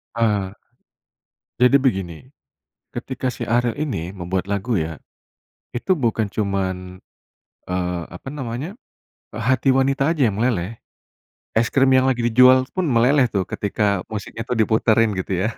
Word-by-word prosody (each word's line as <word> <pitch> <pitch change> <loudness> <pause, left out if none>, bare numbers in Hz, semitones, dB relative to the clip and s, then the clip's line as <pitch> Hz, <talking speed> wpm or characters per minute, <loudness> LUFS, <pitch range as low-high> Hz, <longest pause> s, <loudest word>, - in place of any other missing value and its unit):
Ah. 105 -4 0 1.1
Jadi 125 +3 +6
begini, 95 - -1 0.8
ketika 130 +1 -3
si - - -5
Ariel 120 -1 +2
ini 100 - -3
membuat 95 0 -3
lagu 100 +2 -1
ya. 80 -1 -4 0.7
Itu 175 +8 0
bukan 110 -4 0
cuman, 95 -3 -3 0.7
eee, 90 -1 -2
apa 90 +9 -10
namanya, 135 +4 -5 0.6
hati 130 +5 +1
wanita 135 +3 +2
aja 140 -8 +2
yang 100 - -2
meleleh. 110 -3 -1 0.8
Es 115 +2 +2
krim 135 -1 +3
yang 130 0 +4
lagi 120 -2 0
dijual 130 +2 +6
pun 185 -5 0
meleleh 125 +2 +4
tuh, 95 -4 -1
ketika 100 -2 -1
musiknya 110 +1 -6
tuh 125 - -2
diputerin 110 0 +3
gitu 95 -1 -2
ya, - - +1
115 Hz, 135 wpm, -21 LUFS, 95-130 Hz, 1.1 s, Jadi